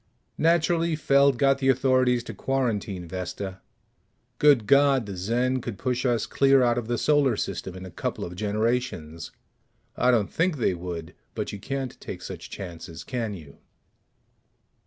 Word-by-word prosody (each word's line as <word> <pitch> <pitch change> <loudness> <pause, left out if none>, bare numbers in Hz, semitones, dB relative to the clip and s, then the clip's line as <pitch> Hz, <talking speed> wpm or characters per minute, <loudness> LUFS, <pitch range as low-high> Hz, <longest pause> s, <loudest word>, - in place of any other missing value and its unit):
Naturally, 165 0 +2
Feld 140 -3 +3
got 135 0 +3
the 135 -1 +2
authorities 130 -1 +3
to - - -7
quarantine 110 -9 -2
Vesta. 95 +2 -5 0.8
Good 140 -7 +5
God, 140 0 +4
the 100 -2 -6
Zen 120 +7 0
could 115 -4 -6
push 130 +2 -1
us 115 -3 +1
clear 135 +1 +4
out 120 0 +2
of 115 - -7
the 120 0 0
Solar 140 -4 +3
System 95 -2 -4
in 95 0 -8
a 95 - -9
couple - - -3
of 90 - -8
generations! 105 -6 -2 0.7
I 125 - +2
don't 115 -5 +2
think 165 -1 +1
they 115 - +1
would, 85 -2 -6 0.2
but - - -3
you 105 - -7
can't 135 +4 -5
take - - -7
such - - -8
chances, 85 -2 -8
can 115 -5 -3
you? 75 -6 -13
120 Hz, 155 wpm, -26 LUFS, 95-135 Hz, 0.8 s, Good